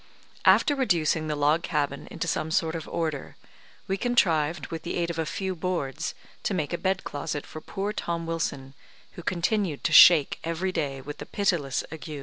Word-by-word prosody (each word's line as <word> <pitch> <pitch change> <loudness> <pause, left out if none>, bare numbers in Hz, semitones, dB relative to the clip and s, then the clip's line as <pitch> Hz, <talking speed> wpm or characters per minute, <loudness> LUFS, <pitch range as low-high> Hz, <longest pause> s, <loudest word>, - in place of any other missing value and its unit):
After 290 - +6
reducing 165 - +1
the 150 - -1
log 150 +3 +2
cabin 145 -3 -2
into - - -4
some 155 - -1
sort 160 0 +1
of 165 -2 -5
order, 155 -5 -3 0.5
we 195 - 0
contrived, 165 - +2
with 165 -1 -4
the 170 - -4
aid 170 -1 0
of 165 - -5
a 160 - -1
few 190 +2 -3
boards, 165 -6 -3 0.3
to 200 - -1
make 155 -2 -2
a 170 - -1
bed 190 +1 0
closet 145 0 -4
for 155 - -9
poor 200 +4 -3
Tom 170 -4 -3
Wilson, 150 -5 -3 0.4
who - - -9
continued 175 -2 -1
to - - 0
shake 160 -6 +8
every 165 +3 -2
day 140 -6 -2
with 145 +2 -8
the - - -7
pitiless 170 -10 0
ague. 160 0 -8
165 Hz, 185 wpm, -27 LUFS, 150-180 Hz, 0.5 s, shake